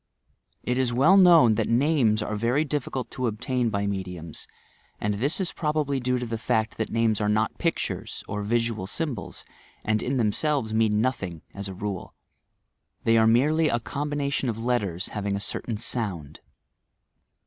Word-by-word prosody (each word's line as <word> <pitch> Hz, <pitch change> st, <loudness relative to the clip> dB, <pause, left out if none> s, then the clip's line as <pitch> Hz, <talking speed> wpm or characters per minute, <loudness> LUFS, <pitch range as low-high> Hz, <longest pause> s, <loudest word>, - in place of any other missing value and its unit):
It 125 Hz, +1 st, 0 dB
is 130 Hz, -2 st, +1 dB
well 140 Hz, +10 st, +5 dB
known 170 Hz, -, +7 dB
that -, -, -2 dB
names 120 Hz, -4 st, +3 dB
are 105 Hz, -, -3 dB
very 120 Hz, +8 st, +1 dB
difficult 135 Hz, -3 st, -3 dB
to 130 Hz, -1 st, -2 dB
obtain 120 Hz, +2 st, -1 dB
by 100 Hz, -1 st, -1 dB
me 100 Hz, -1 st, -1 dB
diums, 85 Hz, -4 st, -8 dB, 0.5 s
and 105 Hz, -, 0 dB
this 135 Hz, -, -1 dB
is 190 Hz, -, -1 dB
probably 150 Hz, -3 st, 0 dB
due 125 Hz, 0 st, 0 dB
to 125 Hz, -, -3 dB
the 115 Hz, -1 st, -4 dB
fact 110 Hz, 0 st, 0 dB
that 110 Hz, -, -2 dB
names 115 Hz, -2 st, +1 dB
are 105 Hz, -, +1 dB
not 110 Hz, +1 st, 0 dB
pictures, 165 Hz, -1 st, -2 dB
or 105 Hz, -, -3 dB
visual 115 Hz, -2 st, -1 dB
symbols, 140 Hz, -4 st, -4 dB, 0.4 s
and 110 Hz, 0 st, +1 dB
in 135 Hz, +2 st, -1 dB
themselves 120 Hz, +1 st, +1 dB
mean 110 Hz, -1 st, +2 dB
nothing, 95 Hz, -10 st, -2 dB
as 100 Hz, 0 st, -5 dB
a 95 Hz, -, -7 dB
rule. 100 Hz, -1 st, -5 dB, 0.9 s
They 115 Hz, -, +4 dB
are 110 Hz, -1 st, +5 dB
merely 150 Hz, +7 st, +3 dB
a 120 Hz, -, +1 dB
combina 140 Hz, +5 st, -3 dB
tion 130 Hz, -, 0 dB
of 110 Hz, -, -3 dB
letters, 100 Hz, -8 st, -1 dB
having 100 Hz, -1 st, -2 dB
a -, -, -2 dB
certain 105 Hz, +2 st, -3 dB
sound. 105 Hz, -, -2 dB
115 Hz, 170 wpm, -26 LUFS, 105-135 Hz, 0.9 s, known